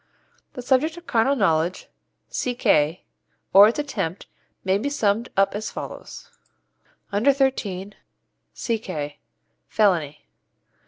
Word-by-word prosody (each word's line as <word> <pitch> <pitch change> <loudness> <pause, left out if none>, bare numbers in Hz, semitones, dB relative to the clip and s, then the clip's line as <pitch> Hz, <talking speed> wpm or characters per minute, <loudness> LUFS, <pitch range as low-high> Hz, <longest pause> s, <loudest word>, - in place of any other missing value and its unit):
The 250 - -7
subject 285 +6 +1
of 345 - -11
carnal 245 +2 +2
knowledge 175 - +1 0.4
(C.K.) 165 -10 +1 0.5
or 200 +2 +10
its 225 - -1
attempt 200 - -3 0.4
may 190 +1 +1
be 280 - -2
summed 225 -4 0
up 195 0 +3
as 210 +1 -4
follows: - - -9 0.8
Under 210 +8 +4
thirteen 210 -8 -1 0.6
C.K. 185 - -4 0.5
Felony. 165 -9 +1
205 Hz, 105 wpm, -23 LUFS, 185-255 Hz, 0.8 s, or